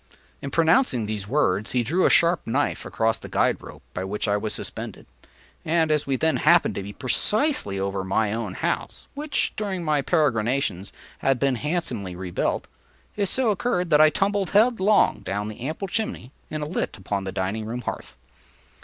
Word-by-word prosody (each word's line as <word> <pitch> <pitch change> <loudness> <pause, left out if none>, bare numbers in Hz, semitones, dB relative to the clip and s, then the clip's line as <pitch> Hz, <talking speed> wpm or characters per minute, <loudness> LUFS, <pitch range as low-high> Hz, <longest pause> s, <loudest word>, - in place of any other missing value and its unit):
In 140 - -4
pronouncing 160 - +3
these 105 -2 -4
words, 105 -6 +1
he 125 -1 +2
drew 170 +10 +2
a - - +3
sharp 170 0 +3
knife 135 +6 -1
across 115 0 0
the - - -10
guide - - +1
rope - - -12
by 90 - -3
which 105 +4 -3
I 100 - +2
was 105 +1 -2
suspended, - - -5 0.6
and 160 -1 +2
as 150 -2 +1
we 135 - +1
then 160 +4 +1
happened 170 +3 +4
to - - -4
be 100 +1 -7
precisely 135 - +1
over 95 0 -2
my 100 +3 0
own 110 -5 -4
house, - - -3
(which, 295 0 -1
during 195 -4 -3
my 150 -3 +1
peregrinations, 120 - 0 0.3
had 135 -1 +2
been 135 +1 +1
handsomely 125 - -3
rebuilt,) 90 -1 -2 0.5
it 200 -1 0
so 255 -4 +2
occurred 180 -4 -1
that 150 0 +6
I 155 - +8
tumbled 195 +2 0
headlong 210 - +4
down 100 +1 -3
the 110 - -10
ample 160 +6 -4
chimney 200 - -3 0.2
and 155 -1 -3
alit 150 -4 -3
upon 100 0 -3
the 95 - -3
dining 95 +3 -2
room 120 +2 -4
hearth. - - -6
135 Hz, 180 wpm, -24 LUFS, 105-175 Hz, 0.6 s, I